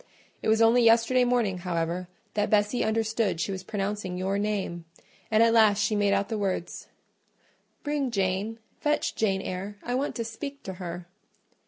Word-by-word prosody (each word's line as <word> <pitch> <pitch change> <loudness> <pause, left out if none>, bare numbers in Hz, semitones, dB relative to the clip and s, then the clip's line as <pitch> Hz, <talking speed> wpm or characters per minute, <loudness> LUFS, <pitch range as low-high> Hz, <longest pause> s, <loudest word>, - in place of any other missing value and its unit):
It - - -3
was 220 +1 +4
only 235 +2 +5
yesterday 230 +2 +5
morning, 235 -7 +1
however, 175 0 -2 0.3
that 210 0 0
Bessie 210 +3 +2
understood 220 -4 0
she 175 - -1
was 190 -1 -4
pronouncing 195 -2 -3
your 190 +2 -1
name; 195 -5 -2 0.4
and 220 +1 +5
at 230 0 +4
last 215 -3 +5
she 210 +1 +1
made 205 -1 +2
out 200 0 +1
the 220 -2 -3
words, 190 -3 -3 1.0
'Bring 290 -3 -1
Jane—fetch 220 - -1
Jane 195 -3 0
Eyre: 195 +3 -5
I 245 - -3
want 270 +3 -1
to 230 - -3
speak 280 +5 -7
to 190 - -5
her. 175 0 -5
210 Hz, 165 wpm, -27 LUFS, 190-230 Hz, 1.0 s, only